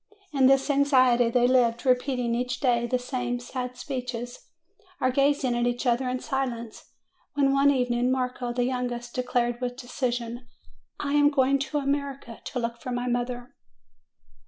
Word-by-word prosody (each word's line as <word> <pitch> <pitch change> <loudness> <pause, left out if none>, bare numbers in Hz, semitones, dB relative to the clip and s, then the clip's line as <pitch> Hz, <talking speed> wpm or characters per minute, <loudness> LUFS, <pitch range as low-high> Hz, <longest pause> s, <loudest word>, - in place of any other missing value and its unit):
In 270 -2 +5
this 270 +2 +4
anxiety 255 -4 +4
they 245 +1 +3
lived, 245 -1 +2
repeating 250 -2 +1
each 245 0 -2
day 240 -3 +2
the 255 - +1
same 245 -1 -3
sad 250 0 -5
speeches, 250 -3 -5 0.6
or 255 - +2
gazing 275 -2 +2
at 240 0 +1
each 245 +2 -2
other 250 +1 +1
in 255 0 -2
silence; 240 -5 -4 0.5
when, 275 -1 +3
one 275 +1 +5
evening, 250 -2 +1
Marco, 250 -1 -1
the 245 0 0
youngest, 245 -1 -3
de 255 - -1
clared 240 -1 -1
with 245 0 -3
decision, 245 -1 -3 0.5
"I 285 -1 -2
am 290 0 +5
going 275 -1 +2
to 280 +2 -2
America 275 -4 -3
to - - -5
look 235 -1 -3
for 250 - -5
my 245 0 -2
mother." 245 +1 -2
250 Hz, 160 wpm, -26 LUFS, 245-270 Hz, 0.6 s, In